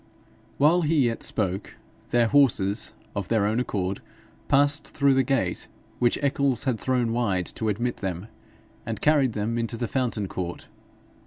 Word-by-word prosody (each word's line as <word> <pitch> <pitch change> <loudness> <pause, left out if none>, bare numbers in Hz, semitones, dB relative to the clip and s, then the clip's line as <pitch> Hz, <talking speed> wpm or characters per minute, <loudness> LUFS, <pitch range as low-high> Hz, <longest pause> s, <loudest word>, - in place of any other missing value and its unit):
While 160 +5 +4
he 155 -4 +2
yet 115 -1 -1
spoke, 95 -2 -2 0.3
their 120 -1 +3
horses, 110 -6 +2 0.2
of 100 -2 -3
their 110 -3 +2
own 110 +3 +1
accord, 95 -6 -2 0.5
passed 145 +2 +2
through 140 -2 +4
the 135 - +4
gate 135 -1 -1 0.3
which 120 -1 +3
Eccles 140 -3 +1
had 125 -5 -1
thrown 125 -3 0
wide 100 -7 0
to 110 - -2
admit 120 +4 -1
them, 95 -1 -4 0.6
and 115 0 -4
carried 145 -5 +3
them 110 +3 -2
into 115 0 -3
the 120 - -2
Fountain 120 -6 -1
court. 90 -2 -5
120 Hz, 155 wpm, -25 LUFS, 105-135 Hz, 0.6 s, While